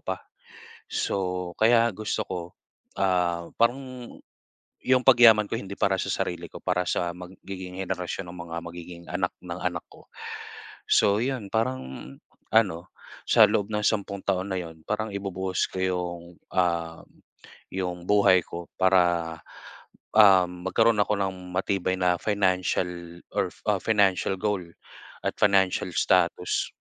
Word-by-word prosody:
pa. 95 0 -3 0.7
So, 90 -2 -2
kaya 115 +1 +5
gusto 110 0 -2
ko, 95 - -4 0.6
ah, 90 -3 +1
parang 125 +1 -1 0.7
'yong 130 0 +4
pagyaman 115 -5 +7
ko - - -2
hindi 100 0 -7
para 95 -1 +3
sa - - -3
sarili 85 -1 -2
ko, - - -8
para 90 0 0
sa 85 0 0
magiging 90 +1 -8
henerasyon 90 0 -4
ng 90 - -11
mga 85 - -6
magiging 85 0 -9
anak 90 0 -1
ng 90 0 -6
anak 90 -1 -2
ko. - - -17 0.8
So 100 0 +4
'yon, 120 -4 -2
parang 110 - -3 0.4
ano, 95 -6 +2 0.4
sa 115 - +6
loob 105 0 -1
ng 105 0 -1
sampung 100 -2 -1
taon 95 0 -1
na 95 - -1
'yon, 80 -2 -10
parang 110 +1 -2
ibubuhos 95 -2 -2
ko - - -6
'yong, 90 -2 -2 0.3
ah, 85 -2 0 0.7
'yong 90 -2 -3
buhay 100 -3 +5
ko 85 0 -8
para, 85 -3 +3 0.8
ah, 95 -4 +7
magkaroon 105 +5 +1
ako 105 - 0
ng 95 -1 -1 0.2
matibay 95 -1 0
na 90 -1 +3
financial 90 -4 -1
orf - - -2
o - - +4
financial 100 -3 +2
goal 105 -2 0 0.6
at - - -1
financial 95 -3 +3
status. - - +2
95 Hz, 135 wpm, -26 LUFS, 90-105 Hz, 0.8 s, pagyaman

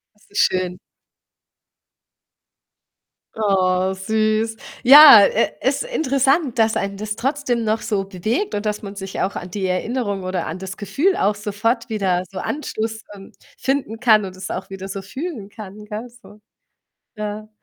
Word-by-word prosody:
Das 210 - -27
ist 205 - -10
schön. 180 -1 +1 2.6
Oh, 190 -3 +1
süß. 215 +3 0 0.3
Ja, 290 +5 +11
äh, - - +2
ist - - 0
interessant, 275 - +1
dass 220 0 +3
einen 200 0 -2
das 215 0 -4
trotzdem 265 -3 -1
noch 220 +1 0
so 205 -3 -1
bewegt 215 - -2
und 205 +1 -3
dass 210 0 -2
man 200 -1 -8
sich 195 -1 -5
auch 195 - -1
an 180 - -7
die 195 -1 -3
Erinnerung 200 +1 -2
oder 185 -2 -3
an 165 - -5
das 190 +1 -7
Gefühl 275 - 0
auch 205 +2 +1
sofort 215 +3 -2
wieder 190 -5 0
so 190 - -7
Anschluss, 220 -4 -4
ähm, 195 0 -13 0.3
finden 265 -5 -2
kann 215 -4 +5
und 185 -1 -8
es 185 - -7
auch 190 +2 -5
wieder 195 0 -7
so 195 0 -5
fühlen 260 - -6
kann, 210 -1 -10
gell 215 +3 -6
so. 235 -3 -18 0.7
Ja. 215 0 -6
210 Hz, 155 wpm, -20 LUFS, 195-235 Hz, 2.6 s, Ja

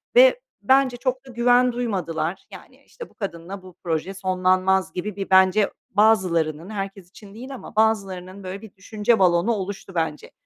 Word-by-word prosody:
ve - - +7 0.2
bence 265 -2 +3
çok 260 +1 -2
da 255 - -10
güven 245 +1 +3
duymadılar. 180 -8 -3
Yani, - - -14
işte, 475 -2 -11
bu - - -26
kadınla 190 -1 -6
bu 185 -2 -14
proje 170 +2 -2
sonlanmaz 185 0 +1
gibi 185 +2 -4
bir, 195 -1 -5
bence, 190 +2 +4 0.2
bazılarının, 180 -6 +2
herkes 195 -3 -6
için 200 +1 -15
değil 255 +5 -8
ama 245 - -11
bazılarının, 195 -3 0
böyle, 190 +2 -6
bir 220 -3 -13
düşünce 210 +3 0
balonu 180 +3 +3
oluştu, 195 -2 -6
bence. 160 -3 -3
195 Hz, 160 wpm, -23 LUFS, 185-225 Hz, 0.2 s, ve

